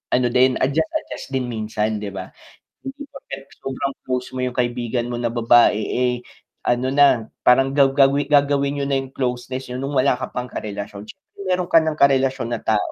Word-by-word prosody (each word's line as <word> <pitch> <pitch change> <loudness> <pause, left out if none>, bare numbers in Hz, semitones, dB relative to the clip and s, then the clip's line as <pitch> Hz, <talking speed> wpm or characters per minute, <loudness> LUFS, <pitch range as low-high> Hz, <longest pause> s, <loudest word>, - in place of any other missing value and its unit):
Ano 125 -1 +2
din, 130 +1 +4
adjust-adjust 155 - -2
din 130 -2 -1
minsan 110 -1 -2
'di 105 - -4
ba? 95 -1 -6 0.5
Hindi 275 +2 -7
porket 135 - -9 0.2
sobrang 135 +1 -3
close 125 -1 -2
mo 130 - -2
yung 125 -1 -2
kaibigan 120 -1 -1
mo 120 - -3
na 120 -1 0
babae, 120 -2 +4
eh, 125 +3 0 0.5
ano 125 +1 +1
na 140 -6 +4 0.2
parang 135 +2 +5
gaw 140 -2 +5
gawi 140 +1 +3
gagawin 140 0 +2
niyo 140 - -1
na 140 - +1
yung 135 0 -7
closeness 130 0 -3
niyo 125 - -4
nung 140 +1 -3
wala 130 -1 +3
ka 130 - -6
pang 125 0 -3
karelasyon, 100 -1 -6
siyempre 200 - -15
meron 180 -1 0
ka 165 - +8
ng 155 -1 -2
karelasyon 135 -3 +2
na 115 - -3
tao. 110 -2 0
130 Hz, 190 wpm, -21 LUFS, 120-140 Hz, 0.5 s, ka